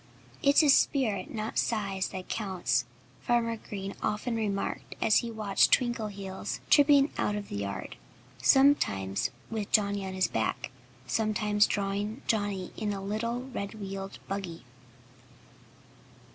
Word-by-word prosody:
"It's 285 +2 +5
spirit, 220 -12 +1
not 220 0 -2
size, 195 -5 -1
that 185 -1 -7
counts," 175 - -1 0.4
Farmer 235 -1 +1
Green 195 -2 -6
often 215 +3 -1
remarked 205 -3 -2
as 215 - +4
he 235 - 0
watched 215 -3 +2
Twinkleheels 210 -6 -1
tripping 285 -1 +6
out 205 - +1
of 205 -1 -5
the - - -4
yard, 100 -2 -5 0.4
sometimes 130 - +3 0.2
with 215 -3 -3
Johnnie 200 -2 +2
on 190 - -5
his 185 -1 +2
back, 110 +3 -2 0.3
sometimes 210 - +2
drawing 205 +4 -2
Johnnie 205 -4 -1
in 210 -1 -2
a 195 - -4
little, 230 +5 -2
red 200 -4 -5
wheeled 195 -2 -6
buggy. 190 -4 -5
205 Hz, 125 wpm, -29 LUFS, 195-225 Hz, 0.4 s, tripping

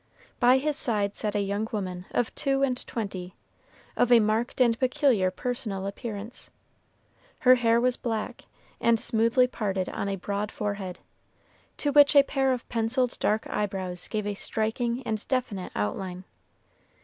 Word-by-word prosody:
By 250 +1 +6
his 295 +2 -1
side 205 -4 +1
sat 210 -1 -2
a 205 - +2
young 200 +2 -2
woman 185 -4 -4
of 245 - -1
two 275 -1 0
and 255 -2 0
twenty, 190 -5 -5 0.6
of 245 - +2
a 240 - +8
marked 220 +4 0
and 235 -2 +3
peculiar 255 -7 +2
personal 205 -1 -4
appearance. 210 +2 -6 0.9
Her 255 - +7
hair 235 -2 +3
was 250 +1 +1
black, 230 +1 -4 0.3
and 230 -1 +3
smoothly 230 +4 +3
parted 195 -6 -2
on 200 - -3
a 195 - -1
broad 200 +2 -3
forehead, 200 -3 -4 0.8
to 290 - 0
which 290 0 +6
a 280 - +9
pair 270 -1 +1
of 250 -2 -3
penciled 240 +2 0
dark 215 +1 +1
eyebrows 190 -3 -2
gave 215 -2 -3
a 205 - -1
striking 235 +4 -2
and 215 -1 -3
definite 240 -8 -2
outline. 180 - -3
220 Hz, 150 wpm, -27 LUFS, 200-250 Hz, 0.9 s, a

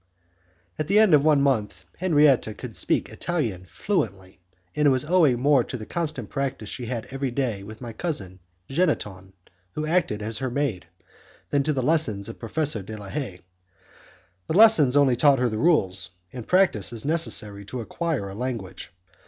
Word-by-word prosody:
At 155 - -2
the 200 +4 +3
end 215 -5 +5
of 145 -2 +6
one 150 -2 +4
month, 115 -7 -1
Henriette 145 - +3
could - - -8
speak - - 0
Italian 115 - -3
fluently, 95 - -3 0.4
and 150 -1 +3
it - - +7
was 130 +1 +1
owing 155 -7 +3
more 140 -1 +4
to 125 - -6
the 110 - -8
constant 155 -8 -3
practice 135 -6 -4
she 120 - -6
had 115 -2 -4
every 135 0 -2
day 120 -5 -2
with 110 +3 -11
my 120 -2 -7
cousin 100 - -4 0.3
Jeanneton, 105 - -2 0.4
who 155 - -3
acted 155 -11 0
as 110 +1 -2
her 130 - -2
maid, 120 - -2 0.6
than 145 - +2
to 155 - 0
the 130 -2 -1
lessons 125 -10 +1
of 115 - -9
Professor 140 -1 -1
de 110 +3 -8
la 100 -2 -9
Haye. 115 -11 -5 1.1
The 165 - 0
lessons 185 - +6
only 140 -3 +4
taught 140 +2 +4
her 125 -1 +1
the 110 -1 -3
rules, 95 - +2 0.2
and 120 -3 -8
practice 180 - +3
is 115 0 -5
necessary 110 -10 0
to 125 +5 -6
acquire 150 - -3
a 95 - -8
language. 110 -7 -5
130 Hz, 175 wpm, -24 LUFS, 105-150 Hz, 1.1 s, it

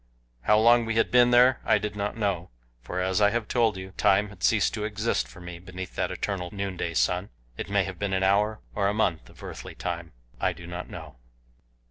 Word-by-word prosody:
How 105 +11 +4
long 120 +2 +5
we 115 0 -2
had 115 - +2
been 125 0 +6
there 125 +1 +5
I - - +4
did 105 0 -4
not 105 +2 -3
know, 100 -5 -1 0.3
for 90 +10 -4
as 95 +2 +1
I 105 - +6
have 115 0 -2
told 115 -5 +2
you, 95 0 -7
time 100 +2 +3
had 105 - -15
ceased 110 -3 +3
to 105 - -3
exist 105 - -1
for - - -14
me 90 -1 -8
beneath 90 0 -8
that - - -1
eternal 95 -3 -3
noonday 95 -4 -3
sun 90 +2 +1 0.3
it - - -6
may 100 -1 +2
have 95 -1 -7
been 100 -1 -1
an 95 0 +1
hour, 105 +3 +2
or 100 -2 +1
a 100 - 0
month 85 - 0
of - - -16
earthly - - -8
time; 85 -2 -5 0.3
I - - +1
do 85 - -11
not 90 +1 -6
know. - - -9
100 Hz, 220 wpm, -27 LUFS, 90-105 Hz, 0.3 s, been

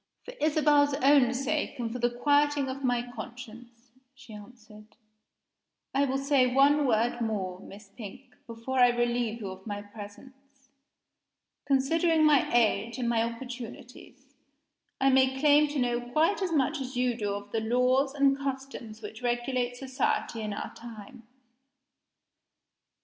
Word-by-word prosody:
"For - - -8
Isabel's 295 -2 +3
own 275 -3 +5
sake, 285 +2 -2
and 230 -2 -4
for 250 - -5
the 240 0 +2
quieting 290 +3 +2
of 270 +1 -6
my 245 -2 +1
conscience," 240 0 -11 0.2
she 265 -4 -14
answered, 215 0 -14 1.0
"I 275 +1 +2
will 270 0 -1
say 275 -2 +2
one 280 +2 +4
word 235 +1 +1
more, 195 -5 -3
Miss 200 +1 -13
Pink, 235 +5 -11
before 230 +3 -4
I 245 -1 +7
relieve 240 -1 -1
you 200 - -5
of 190 +2 -12
my 205 -1 -5
presence. 260 +6 -14 1.0
Considering 315 +4 +2
my 300 -3 +4
age 230 0 +1
and 245 -2 -2
my 230 -1 +2
opportunities, 240 +1 -8 0.7
I 270 0 +4
may 265 0 +3
claim 295 +1 +5
to 295 0 -5
know 245 -2 0
quite 320 +10 +1
as 370 -3 -1
much 300 -1 0
as 260 -1 -6
you 250 -1 +1
do 205 -3 -2
of 205 0 -8
the 225 - -1
laws 250 +4 +1
and 275 -1 +3
customs 265 -5 -6
which 215 +2 -8
regulate 245 0 -1
society 260 -3 -2
in 215 -1 -4
our 205 - -6
time. 230 +1 -12
250 Hz, 145 wpm, -28 LUFS, 230-275 Hz, 1.0 s, I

